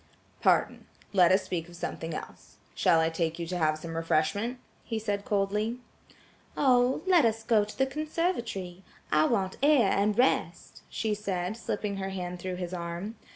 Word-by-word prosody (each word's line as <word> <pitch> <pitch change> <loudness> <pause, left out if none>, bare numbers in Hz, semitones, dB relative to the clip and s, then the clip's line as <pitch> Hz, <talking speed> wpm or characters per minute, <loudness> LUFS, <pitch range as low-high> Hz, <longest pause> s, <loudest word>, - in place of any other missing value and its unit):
"Pardon. - - +2 0.3
Let 180 -3 +6
us 190 +1 +4
speak 170 -1 -4
of 175 - -12
something 165 -1 -5
else. - - -10 0.2
Shall 165 - +3
I 160 0 +2
take 165 -1 -1
you 170 - -3
to 180 +2 -3
have 155 -1 +2
some 165 +1 -7
refreshment?" 165 +9 0 0.3
he 225 - -3
said 205 -2 -2
coldly. 210 +3 0 0.8
"Oh, 255 +1 +3
let 360 -5 +5
us 225 -1 +1
go 225 -2 +3
to 210 - -9
the 265 - +3
conservatory. 265 - -3 0.3
I 155 0 +4
want 190 +2 0
air 275 -8 +5
and 205 +1 +1
rest," 255 +2 0
she 220 -2 -1
said, 195 -2 -2
slipping 205 -3 -3
her 195 0 -3
hand 180 -2 -5
through 185 +1 -4
his 180 0 -5
arm. 170 +4 -4
195 Hz, 170 wpm, -29 LUFS, 175-230 Hz, 0.8 s, Let